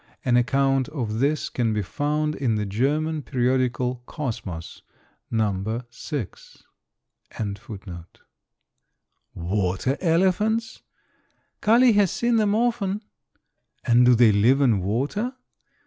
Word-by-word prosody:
An 125 -2 +3
account 135 +2 +2
of 115 -8 -3
this 145 +4 +1
can 115 -3 -1
be 105 -1 -1
found 150 +7 -1
in 125 -7 -1
the 105 -1 -1
German 150 +9 0
periodical 125 -1 0
"Kosmos," 105 - -6 0.5
No. 110 +1 -1
6.] 120 - -7 0.7
answered 100 -2 -4
the - - -12
young 105 - -5
negro 95 - -21
quietly. 85 -3 -11 1.1
"Water 95 +8 -1
elephants?" 200 +6 +1 0.8
"Kali 235 +2 +5
has 205 -2 +3
seen 235 +4 +1
them 210 -1 +2
often." 220 -3 0 0.8
"And 120 +1 +5
do 125 0 +6
they 115 -2 +6
live 115 +7 +4
in 120 -9 +3
water?" 145 - -2
130 Hz, 120 wpm, -24 LUFS, 110-160 Hz, 1.1 s, do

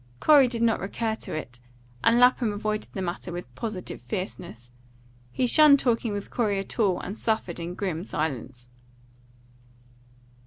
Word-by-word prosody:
Corey 290 -4 +6
did 235 -1 -2
not 230 -1 +2
recur 220 +3 -2
to 220 - -5
it, 125 -5 -7 0.4
and 230 +1 +4
Lapham 245 -2 +4
avoided 215 +1 -3
the 190 - -3
matter 175 0 -4
with 175 -8 -7
positive 205 - -5
fierceness. 125 - -6 0.6
He 255 - 0
shunned 295 +3 +7
talking 235 -4 0
with 205 -1 -5
Corey 210 -5 0
at 195 +4 -5
all, 195 -5 +2
and 195 - -6
suffered 220 -7 -2
in 170 +1 -5
grim 180 -4 -3
silence. 130 - -4
200 Hz, 150 wpm, -26 LUFS, 175-230 Hz, 0.6 s, shunned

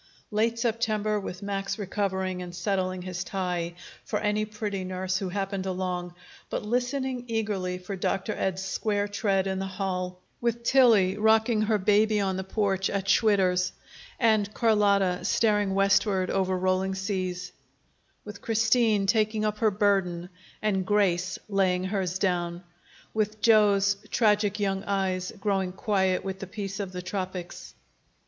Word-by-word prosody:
Late 225 +2 +1
September, 215 -2 0
with 185 -1 -7
Max 195 -1 -2
recovering 190 -2 -2
and 175 -1 -7
settling 185 0 -1
his 180 -1 -4
tie 180 -2 -3 0.3
for - - -2
any 210 0 0
pretty 210 -2 -4
nurse 185 0 -2
who 190 - -3
happened 195 0 -3
along, 180 -1 -3 0.3
but - - -3
listening 250 +2 -1
eagerly 205 -5 -2
for 185 +2 -6
Dr. 195 +1 -1
Ed's 190 0 -2
square 205 +1 -1
tread 200 -2 0
in 190 0 -2
the 195 - -2
hall; 185 -1 -3 0.2
with 235 0 -1
Tillie 225 -8 +5
rocking 220 +1 +3
her 215 0 +2
baby 210 +2 +3
on 190 -2 0
the 190 - -3
porch 195 -1 0
at 195 -1 -2
Schwitter's, 185 -4 +3 0.5
and 215 -4 +3
Carlotta 200 -5 +2
staring 205 -1 +2
westward 195 -1 +2
over 190 -1 +1
rolling 185 +1 0
seas; 185 -2 -3 0.7
with 210 - -9
Christine 225 -2 +2
taking 215 0 +1
up 210 0 -1
her 220 - +4
burden 190 -4 +1 0.3
and 195 -3 +1
Grace 185 -2 +1
laying 190 -3 +1
hers 190 -2 -1
down; 175 -2 -1 0.5
with 215 0 -1
Joe's 200 -3 +4
tragic 210 -2 +2
young 195 -1 -1
eyes 190 -1 -1
growing 195 -3 0
quiet 190 -1 0
with 190 -1 -5
the 195 - -6
peace 195 0 -5
of 195 -2 -4
the 180 -1 -6
tropics. 185 -2 -5
195 Hz, 145 wpm, -27 LUFS, 185-210 Hz, 0.7 s, Tillie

